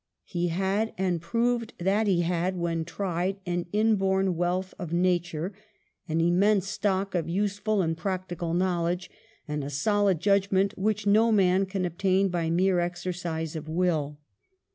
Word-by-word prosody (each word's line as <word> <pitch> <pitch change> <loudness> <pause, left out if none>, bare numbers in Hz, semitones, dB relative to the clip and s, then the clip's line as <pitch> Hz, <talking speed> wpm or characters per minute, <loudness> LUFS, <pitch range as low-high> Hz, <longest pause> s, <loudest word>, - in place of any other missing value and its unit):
He 175 -1 -1
had, 195 +5 -1
and 180 -3 0
proved 230 +6 -1
that 200 +5 +1
he 180 -3 +3
had, 175 +2 0
when 165 -2 -1
tried, 185 +1 -2
an 175 -1 -2
inborn 195 -3 +2
wealth 180 +2 -1
of 175 -4 -5
nature, 175 0 0 0.6
an 160 +1 0
immense 190 +4 +3
stock 195 -1 -1
of 170 -3 -1
useful 205 0 0
practical 175 -1 -3
knowledge, 175 -1 0 0.4
and 150 -1 -3
a 140 - -4
solid 195 +5 +1
judgment 195 +1 +2
which 210 +1 -1
no 220 +3 +4
man 190 -2 +3
can 190 -1 -2
obtain 190 +3 +1
by 170 -2 -1
mere 180 +2 +2
exercise 175 -2 -3
of 155 0 -6
will. 160 -4 0
185 Hz, 140 wpm, -27 LUFS, 170-195 Hz, 0.6 s, no